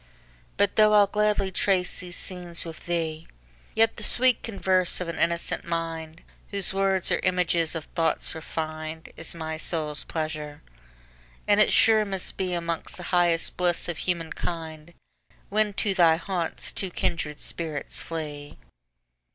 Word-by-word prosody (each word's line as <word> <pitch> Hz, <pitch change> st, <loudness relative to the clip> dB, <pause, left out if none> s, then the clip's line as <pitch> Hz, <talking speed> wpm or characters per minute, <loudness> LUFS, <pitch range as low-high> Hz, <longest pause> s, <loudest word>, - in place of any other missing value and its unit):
But 205 Hz, 0 st, +2 dB
though 215 Hz, 0 st, +6 dB
I'll 205 Hz, -1 st, +7 dB
gladly 210 Hz, -1 st, +1 dB
trace 185 Hz, -1 st, +1 dB
these 180 Hz, -1 st, -7 dB
scenes 175 Hz, -2 st, -3 dB
with 165 Hz, 0 st, -10 dB
thee, 165 Hz, -2 st, -2 dB, 0.5 s
Yet 225 Hz, 0 st, +3 dB
the 215 Hz, -, -5 dB
sweet 250 Hz, +2 st, +5 dB
converse 190 Hz, -4 st, +1 dB
of 180 Hz, -, -3 dB
an 170 Hz, -1 st, -5 dB
innocent 170 Hz, 0 st, 0 dB
mind, 165 Hz, -1 st, -4 dB, 0.3 s
Whose 200 Hz, -2 st, +3 dB
words 195 Hz, -1 st, +1 dB
are -, -, +2 dB
images 175 Hz, -3 st, +1 dB
of 160 Hz, -, -4 dB
thoughts 165 Hz, -1 st, 0 dB
refin'd, 155 Hz, 0 st, -5 dB
Is 165 Hz, -, -3 dB
my 160 Hz, -1 st, -5 dB
soul's 155 Hz, -3 st, -2 dB
pleasure; 155 Hz, -2 st, -5 dB, 0.8 s
and 205 Hz, 0 st, +4 dB
it 210 Hz, -, +5 dB
sure 220 Hz, -1 st, +5 dB
must 195 Hz, -3 st, -2 dB
beAlmost 170 Hz, -3 st, -2 dB
the 180 Hz, -, -8 dB
highest 175 Hz, -2 st, +2 dB
bliss 175 Hz, -1 st, +2 dB
of 175 Hz, -3 st, -3 dB
human 170 Hz, -3 st, -2 dB
kind, 160 Hz, -1 st, -6 dB, 0.5 s
When 215 Hz, 0 st, +2 dB
to 205 Hz, 0 st, 0 dB
thy 170 Hz, -4 st, +5 dB
haunts 175 Hz, -1 st, -3 dB
two 190 Hz, -, -1 dB
kindred 155 Hz, -4 st, -2 dB
spirits 160 Hz, -4 st, -3 dB
flee. 150 Hz, -3 st, -6 dB
170 Hz, 145 wpm, -26 LUFS, 160-190 Hz, 0.8 s, I'll